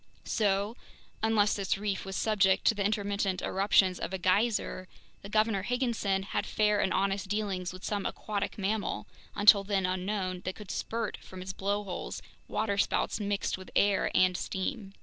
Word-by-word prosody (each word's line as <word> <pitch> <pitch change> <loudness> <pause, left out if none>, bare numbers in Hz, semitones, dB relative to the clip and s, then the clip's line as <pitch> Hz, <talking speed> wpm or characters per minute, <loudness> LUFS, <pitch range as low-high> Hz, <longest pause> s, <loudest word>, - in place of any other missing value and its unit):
So, 205 0 +1 0.5
unless 215 -2 +3
this 195 -1 -1
reef 200 -2 -2
was 195 0 -5
subject 195 -3 +2
to - - +6
the 205 -2 -2
intermittent 200 -2 0
eruptions 190 -1 +3
of - - -4
a - - 0
geyser, 185 0 +1 0.3
the 200 - -9
Governor 215 -1 +2
Higginson 230 -4 0
had - - -2
fair 210 -1 +2
and 190 - +1
honest 195 +1 0
dealings 195 -3 -2
with 185 +1 -11
some 205 -2 -1
aquatic 205 -1 -3
mammal, 200 - -1 0.3
until 205 -1 +7
then 195 -1 0
unknown, 185 0 -2
that 185 - -3
could 210 -3 -8
spurt 225 -2 -3
from 185 -1 -10
its 190 +1 -5
blowholes 200 -1 -3 0.2
waterspouts 205 0 0
mixed 200 -2 -1
with 185 - -10
air 200 -1 +3
and 185 0 +4
steam. 195 +1 -4
200 Hz, 160 wpm, -30 LUFS, 190-210 Hz, 0.5 s, until